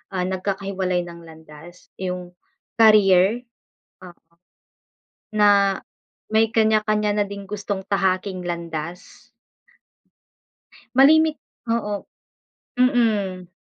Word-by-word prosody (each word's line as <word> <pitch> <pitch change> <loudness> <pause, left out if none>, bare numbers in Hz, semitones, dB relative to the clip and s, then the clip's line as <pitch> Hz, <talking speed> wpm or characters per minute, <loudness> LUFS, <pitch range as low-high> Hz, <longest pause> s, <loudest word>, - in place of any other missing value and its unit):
ah, 180 - 0
nagkakahiwalay 190 -1 -2
ng 170 -1 -10
landas 160 +2 -15
yung 180 -1 -5 0.5
career. 210 0 +5 0.6
O 180 -2 -12 1.2
Na, 200 -2 +4 0.6
may 220 +1 +4
kanya-kanya 215 -1 +1
na 205 - +2
ding 200 0 -8
gustong 200 -1 -5
tahaking 190 -1 -1
landas. 170 0 -7 1.7
Malimit 315 +3 +5 0.4
oo, 210 -3 -2 0.8
mm. 215 -8 +1
195 Hz, 80 wpm, -22 LUFS, 180-215 Hz, 1.7 s, career